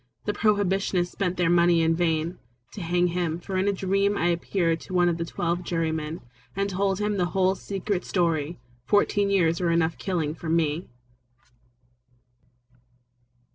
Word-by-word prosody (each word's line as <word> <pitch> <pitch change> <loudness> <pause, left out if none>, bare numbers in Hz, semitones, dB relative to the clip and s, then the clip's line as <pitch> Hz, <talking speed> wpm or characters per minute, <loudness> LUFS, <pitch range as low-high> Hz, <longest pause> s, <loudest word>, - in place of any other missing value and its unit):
The 210 - 0
Prohibitionists 195 -4 +1
spent 185 -2 -2
their 175 -2 +2
money 170 -1 +4
in 165 0 +3
vain 165 0 0 0.3
To 205 - -7
hang 175 +1 +1
him, 170 -1 -1
for 190 +2 -6
in 185 +2 +1
a - - +4
dream 195 +1 +1
I 175 -1 +2
appeared 170 -1 0
to 185 - -7
one 175 -1 +4
of 170 -1 +1
the 170 - -1
twelve 170 +1 -2
jurymen 160 -2 -2 0.3
And 200 0 -1
told 195 0 0
him 210 0 -1
the 180 - +2
whole 190 0 +4
secret 195 -1 -3
story. 165 -3 0 0.3
Fourteen 205 +6 +2
years 170 -4 +2
were 175 - +1
enough 165 -1 +2
for - - -25
killing 165 -6 -2
me. 160 0 0
175 Hz, 160 wpm, -26 LUFS, 165-195 Hz, 0.3 s, money